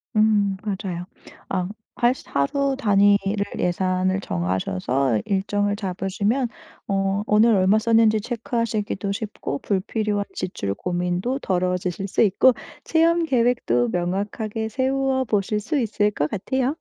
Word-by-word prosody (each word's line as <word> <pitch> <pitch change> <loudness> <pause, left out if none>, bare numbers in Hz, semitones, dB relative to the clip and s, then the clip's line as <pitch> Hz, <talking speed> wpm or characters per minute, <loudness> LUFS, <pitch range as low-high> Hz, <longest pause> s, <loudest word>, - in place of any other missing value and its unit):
음 210 -2 +3
맞아요. 190 -4 -4 0.4
아 185 -2 -1 0.3
할 240 +1 +4
수 - - -14
하루 275 - +1
단위를 200 -3 +3
예산을 185 +1 0
정하셔서 95 - -1
일정을 205 +1 0
잡으시면 200 +6 -1 0.4
어 195 0 0
오늘 220 +2 +4
얼마 195 +3 +4
썼는지 225 -1 +3
체크하시기도 220 -4 -2
쉽고 205 - -4
불필요한 205 +1 -1
지출 100 - -3
고민도 180 - -2
덜어지실 180 -1 -1
수 - - 0
있고 220 +5 +5 0.3
체험 335 +1 +3
계획도 235 - +2
명확하게 205 - -2
세워 265 +2 0
보실 210 -1 0
수 280 +7 -1
있을 210 -2 +1
것 150 -6 -1
같아요. 260 +7 -1
205 Hz, 280 characters per minute, -23 LUFS, 185-230 Hz, 0.4 s, 있고